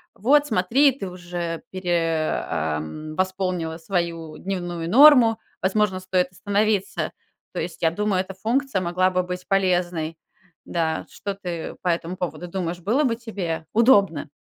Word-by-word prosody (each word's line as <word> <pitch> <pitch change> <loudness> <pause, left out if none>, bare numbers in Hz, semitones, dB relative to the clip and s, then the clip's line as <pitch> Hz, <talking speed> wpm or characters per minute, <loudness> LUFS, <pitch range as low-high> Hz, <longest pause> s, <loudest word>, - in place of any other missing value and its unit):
"Вот 285 +7 +4
смотри, 245 +7 +4
ты 220 -8 -6
уже 175 -2 -5
пере 170 -4 0 0.2
ам, 80 - -3
восполнила 185 -3 -1
свою 165 -3 -3
дневную 175 -3 -4
норму, 245 - +7 0.2
возможно, 190 0 +1
стоит 185 -1 0
остановиться". 205 +1 0 0.4
То - - -3
есть, 170 +2 -5
я 165 -1 +3
думаю, 205 0 0
эта 190 +1 -7
функция 235 0 0
могла 185 +1 +2
бы 185 - +1
быть 180 0 -6
полезной, 175 -4 0 0.5
да. 160 -2 -1
Что 200 -1 -5
ты 175 -4 -5
по 180 - +1
этому 170 +1 -1
поводу 180 0 -4
думаешь, 175 -1 -3
было 230 - +1
бы 240 -5 +1
тебе 195 -9 -4
удобно? 200 - +4
185 Hz, 140 wpm, -23 LUFS, 170-200 Hz, 0.5 s, норму